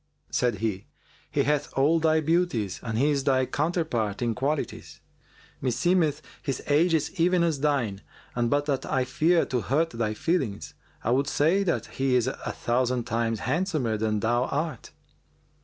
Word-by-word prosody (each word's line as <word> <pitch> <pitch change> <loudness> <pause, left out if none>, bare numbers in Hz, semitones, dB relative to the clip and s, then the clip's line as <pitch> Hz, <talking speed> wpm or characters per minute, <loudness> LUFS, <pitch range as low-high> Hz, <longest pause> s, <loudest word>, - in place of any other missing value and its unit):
Said 120 -3 +1
he, 105 -2 -3 0.4
"He - - +1
hath 150 +1 0
all 150 +5 +3
thy 160 0 +3
beauties; 155 - 0
and 115 -2 -3
he 145 +5 +3
is 140 -2 0
thy 130 -2 +2
counterpart 140 - -1
in 120 -1 +1
qualities. 140 +5 -3 0.6
Meseemeth 155 +4 +1 0.2
his 135 -4 -2
age 165 +4 +3
is 155 -1 -1
even 175 0 +3
as 160 -4 0
thine 130 -9 0 0.3
and 120 -1 0
but 145 +2 +1
that 140 -3 -1
I 130 -1 +1
fear 165 +7 +2
to 125 -2 -1
hurt 155 +8 +1
thy 115 -2 -2
feelings, 135 - -1 0.3
I 115 - 0
would 135 +3 +2
say 165 +7 +2
that 170 - 0
he 135 -1 0
is 125 -2 +3
a 130 - -1 0.2
thousand 125 0 0
times 115 -2 -1
handsomer 155 - 0
than 110 -1 -1
thou 120 +2 +2
art." 155 +4 -3
135 Hz, 165 wpm, -26 LUFS, 120-160 Hz, 0.6 s, all